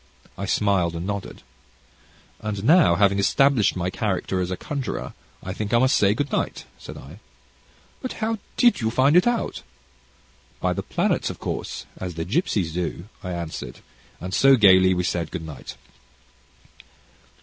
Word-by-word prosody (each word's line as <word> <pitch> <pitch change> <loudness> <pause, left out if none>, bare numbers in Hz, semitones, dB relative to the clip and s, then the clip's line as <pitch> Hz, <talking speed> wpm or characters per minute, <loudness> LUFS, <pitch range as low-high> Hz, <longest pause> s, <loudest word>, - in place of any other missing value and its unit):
I - - -5
smiled 95 -5 +1
and 85 +1 -4
nodded. 100 -1 -5 1.0
"And 105 -2 -4
now, 155 - +5
having 100 +1 +3
established 135 +2 +3
my 90 0 -2
character 95 -3 -1
as 90 - -2
a 95 - -3
conjurer, 140 -3 -4 0.3
I 95 - -4
think 105 +3 -2
I - - +6
must 130 +3 +3
say 100 +1 +3
good 145 +3 -2
night," - - -2
said - - -9
I. - - -12 0.8
"But 255 - -4
how 225 0 -2 0.2
did 240 - +4
you 110 - +1
find 130 +6 +3
it 180 +5 +5
out?" 240 -1 -1 1.0
"By - - 0
the - - -3
planets, - - 0
of - - -6
course, - - -5
as 90 -3 -5
the 80 0 -3
gipsies 100 - 0
do," 90 +2 -4
I 90 - -5
answered, 85 -8 -6 0.4
and 90 +2 -6
so, 135 +6 +6
gaily 95 -4 +6
we 90 - 0
said 85 -2 -1
good 85 -3 -6
night. 75 -5 -9
100 Hz, 160 wpm, -23 LUFS, 90-130 Hz, 1.0 s, I